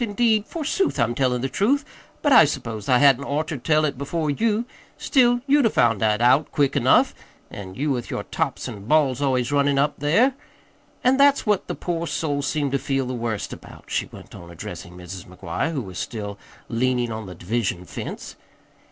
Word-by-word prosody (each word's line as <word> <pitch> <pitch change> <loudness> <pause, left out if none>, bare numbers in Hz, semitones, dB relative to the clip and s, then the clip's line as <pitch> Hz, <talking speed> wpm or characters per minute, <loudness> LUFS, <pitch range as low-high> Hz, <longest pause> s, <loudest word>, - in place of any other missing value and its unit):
Indeed, 220 -1 +1
forsooth, 335 +4 -1
I'm 115 +1 +2
tellin' 125 -1 0
the - - +1
truth, 245 - +1 0.4
but 290 -2 +4
I 165 - +9
s'pose 115 -7 -4
I 125 - +5
hadn't 140 0 +5
oughter 155 +3 -2
told 155 +4 +2
it 140 -4 -3
before 150 +2 -1
you. 220 +8 0 0.3
Still, 245 -3 +3
you'd 285 -3 +4
'a' - - +1
found 115 - +2
it 110 0 +2
out 130 +5 +4
quick 140 -2 +1
enough - - +4 0.4
an' 95 -2 -8
you 145 +2 -1
with 125 -3 -3
your - - -3
tops - - -3
an' 100 -1 -8
balls 140 -3 +2
always 130 -3 +1
runnin' 140 -1 +2
up 145 +2 +1
there. 195 - +3 0.7
An' 255 +1 +4
that's 280 0 +4
what 210 -3 +1
the - - -3
poor 170 -1 -3
soul 145 -4 -1
seemed 140 -1 -1
to 140 - +1
feel 135 -1 -1
the 130 - -4
worst 115 -4 -3
about," - - -13
she - - -1
went - - -13
on, 85 - -11
addressing 85 +1 -9
Mrs. 90 +1 -9
McGuire, 90 - -3
who 140 -6 -3
was 95 -3 -8
still 105 -3 -5 0.3
leaning 120 0 0
on 110 -2 -5
the 90 - -9
division 90 -1 -2
fence. - - -7
140 Hz, 195 wpm, -23 LUFS, 115-165 Hz, 0.7 s, I